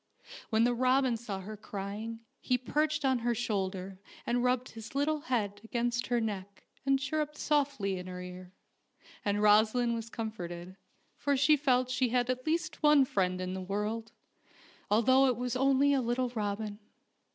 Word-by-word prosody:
When 220 0 +3
the 245 +1 +3
robin 255 0 +3
saw 215 -4 -5
her 215 +3 -7
crying 210 +2 -6 0.2
he 250 - +1
perched 300 +3 0
on 260 -2 +3
her 240 0 0
shoulder 195 -4 -3 0.3
and 240 +1 +1
rubbed 250 0 +1
his 225 +3 -10
little 300 +2 +1
head 210 -7 -2
against 240 0 -1
her 240 +1 +1
neck 200 -3 -4 0.2
and 275 0 +4
chirruped 300 +2 -2
softly 275 -12 0
in 180 - -8
her 180 0 -6
ear, 180 0 -9 0.7
and 205 0 0
Rosaleen 220 +3 +4
was 230 -1 -4
comforted, 185 -6 -6 0.4
for 285 -1 +1
she 280 +3 +5
felt 255 -3 +2
she 255 -1 +1
had 245 +1 +1
at 255 +3 -5
least 330 +2 -1
one 295 -2 +6
friend 185 -6 0
in 185 0 -3
the 190 - -4
world, 210 +4 -3 0.8
although 260 +5 +5
it 250 - +1
was 250 0 -2
only 275 +2 +4
a 270 - +2
little 245 +1 0
robin. 210 -2 -3
235 Hz, 165 wpm, -31 LUFS, 205-260 Hz, 0.8 s, one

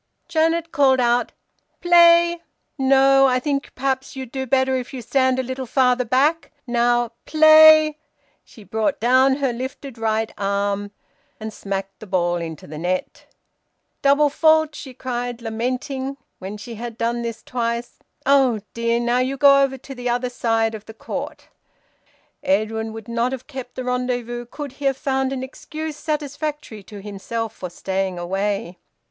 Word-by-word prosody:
Janet 330 0 +1
called 270 -4 +4
out 240 0 +2 0.5
"Play 340 0 +5 0.3
no, 270 0 +5
I 255 -1 +2
think 280 +1 -2
perhaps 265 0 -2
you'll 260 -2 -6
do 265 +1 -4
better 260 +1 +2
if 255 +1 -4
you 255 - -5
stand 260 +2 +2
a 260 - 0
little 260 0 -5
farther 250 0 +2
back. 285 +7 +1
Now 240 -1 +1 0.2
play!" 310 -1 +7 0.4
She 220 - -16
brought 220 +8 -1
down 260 +3 +4
her 270 -3 -1
lifted 260 0 -7
right 220 0 -1
arm, 200 0 -1 0.5
and 220 0 -6
smacked 195 -1 -5
the 215 - -10
ball 175 -2 +1
into 165 -3 -6
the 155 +1 -8
net. 180 +2 -3 0.7
"Double 285 +1 +4
fault!" 315 0 +3
she 265 -4 -9
cried, 245 -1 -4
lamenting, 255 +4 -3 0.2
when 195 +3 -6
she 235 +3 -9
had 230 0 -7
done 235 +1 -1
this 230 -1 -5
twice. 235 -1 -3 0.3
"Oh 265 -5 +4
dear! 235 0 0
Now 240 +1 +1
you 260 +2 -1
go 275 0 +6
over 270 -1 +1
to 270 +2 -10
the 245 -1 -4
other 245 +1 -1
side 225 -2 0
of 215 -1 -8
the 220 - -11
court." - - -6 0.9
Edwin 220 -6 0
would 220 -1 -9
not 235 +2 -1
have 260 -1 -6
kept 260 -4 -8
the 255 - -4
rendezvous 245 -1 -2
could 290 +2 -7
he 280 +2 -9
have 270 -1 +2
found 265 -2 -1
an 260 -1 -3
excuse 310 +3 -7
satisfactory 295 -5 -4
to 200 +1 -11
himself 215 +2 -5
for 180 - -7
staying 190 +1 -3
away. 195 0 -2
250 Hz, 160 wpm, -21 LUFS, 225-275 Hz, 0.9 s, play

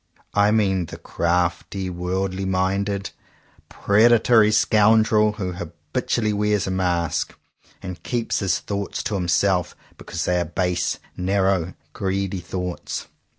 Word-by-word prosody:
I 100 0 +4
mean 95 -5 +1
the - - -8
crafty, 90 +2 -1
worldly 95 +2 -2
minded, 95 +1 -1 0.6
preda 115 +4 +4
tory 110 -3 +5
scoundrel, 110 0 +4
who 95 -4 -4
habitually 90 +7 -2
wears 105 -1 +1
a 95 - -2
mask, 90 -3 -1 0.5
and 90 -3 -7
keeps 120 +2 -1
his 95 -3 +1
thoughts 100 -1 -4
to - - -3
himself 90 0 +1 0.2
because - - -4
they 90 0 +1
are 85 - 0
base, 90 +1 -1 0.2
narrow, 95 -1 0 0.2
greedy 95 -1 -2
thoughts. 90 -4 -5
95 Hz, 120 wpm, -23 LUFS, 90-105 Hz, 0.6 s, tory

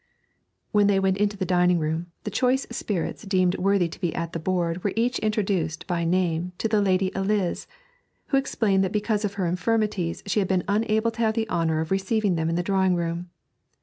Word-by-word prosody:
When 205 -1 +4
they 200 -1 +3
went 190 0 +1
into 205 0 0
the 190 - -1
dining 180 -1 +3
room, 160 +2 -2 0.2
the - - -4
choice 255 +1 +1
spirits 205 -7 -3
deemed 185 -3 +1
worthy 195 -2 +2
to 165 - -11
be 175 -3 -1
at 165 0 -3
the 165 - -2
board 175 0 -1
were 200 - 0
each 240 +2 +1
introduced 195 -7 -1
by 175 -2 -1
name 175 0 0
to - - 0
the 215 -1 +2
Lady 190 -1 +2
Eliz, 195 -1 -1 0.6
who 275 - +3
explained 205 -7 +1
that 190 - -1
because 210 0 0
of 200 -1 -2
her 195 -3 -1
infirmities 180 -1 -1
she 200 +1 +1
had 195 - +1
been 185 -2 +1
unable 220 +2 +1
to 225 - -14
have 220 -1 +2
the 225 -1 0
honour 160 -2 +1
of 160 - -5
receiving 195 +1 +1
them 160 -1 0
in 165 - 0
the 175 - 0
drawing 190 0 +2
room. 170 +1 -3
190 Hz, 210 wpm, -25 LUFS, 175-210 Hz, 0.6 s, When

